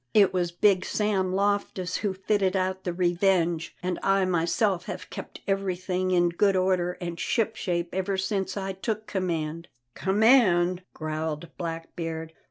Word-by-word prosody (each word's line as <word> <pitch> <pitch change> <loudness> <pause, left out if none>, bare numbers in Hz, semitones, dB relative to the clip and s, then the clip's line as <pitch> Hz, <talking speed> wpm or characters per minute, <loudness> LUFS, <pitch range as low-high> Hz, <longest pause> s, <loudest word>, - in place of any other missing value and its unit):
It 200 -3 +6
was 175 -2 0
Big 185 +1 +3
Sam 200 -3 0
Loftus 195 -2 0
who 200 -3 -2
fitted 195 0 +1
out 190 0 -1
the 180 - 0
Revenge, 175 -1 +1
and 180 -1 -1
I 195 -1 +3
myself 180 +2 +1
have 185 0 -6
kept - - -8
everything 185 -1 -1
in 175 -1 +3
good 195 +3 +2
order 185 -1 +1
and 170 -1 -6
ship 225 -2 0
shape 170 -2 -2
ever 190 +1 -1
since 190 +1 -1
I 195 -1 -3
took 215 +3 -3
command." 165 -4 -2 0.3
"Command!" 190 -4 +4
growled 155 +1 -4
Blackbeard. 165 -1 -5
185 Hz, 145 wpm, -27 LUFS, 175-195 Hz, 0.3 s, It